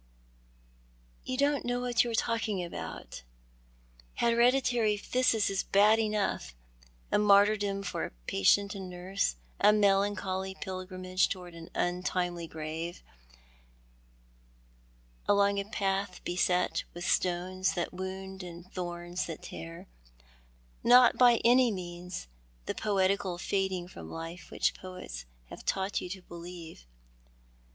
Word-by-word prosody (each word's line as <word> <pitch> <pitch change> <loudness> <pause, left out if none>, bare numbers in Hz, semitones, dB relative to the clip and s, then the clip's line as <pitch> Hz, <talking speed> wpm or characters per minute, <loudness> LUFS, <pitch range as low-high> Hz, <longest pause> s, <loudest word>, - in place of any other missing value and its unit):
" - - -33
You 255 - -2
don't 285 0 +2
know 245 0 -1
what 245 -1 +2
you 240 - -3
are 230 - -1
talking 220 -4 0
about. 170 - -7 0.9
Hereditary 235 -2 +3
phthisis 225 0 +2
is 195 - 0
bad 210 +3 +4
enough 210 - -1 0.3
— - - -29
a - - +4
martyrdom 205 -1 +4
for 180 - -3
patient 200 - +3
and 190 -2 -6
nurse 180 - -1
— - - -32
a 210 - +7
melancholy 195 -2 +1
pilgrimage 185 0 -1
towards 180 -2 -6
an 165 0 -10
untimely 175 -1 -1
grave, 160 +2 -5 2.2
along 200 0 +4
a 200 - -2
path 195 -2 -2
be?et 180 0 +1
with 175 +1 -5
stones 185 +1 +1
that 175 0 -2
wound 190 +1 -6
and 175 +1 -10
thorns 175 0 -4
that 165 -2 -7
tear— 85 0 -8 1.0
not 245 +1 +7
by 245 -1 +7
any 245 +1 +6
means 180 - -6 0.4
the - - -2
poetical 195 -3 +1
fading 190 -1 -1
from 80 - -10
life 165 +2 -7
which - - +1
poets 180 - -8 0.3
have - - -9
taught 190 +1 0
you - - -6
to 190 0 -7
believe. 170 - -10
185 Hz, 125 wpm, -30 LUFS, 175-205 Hz, 2.2 s, a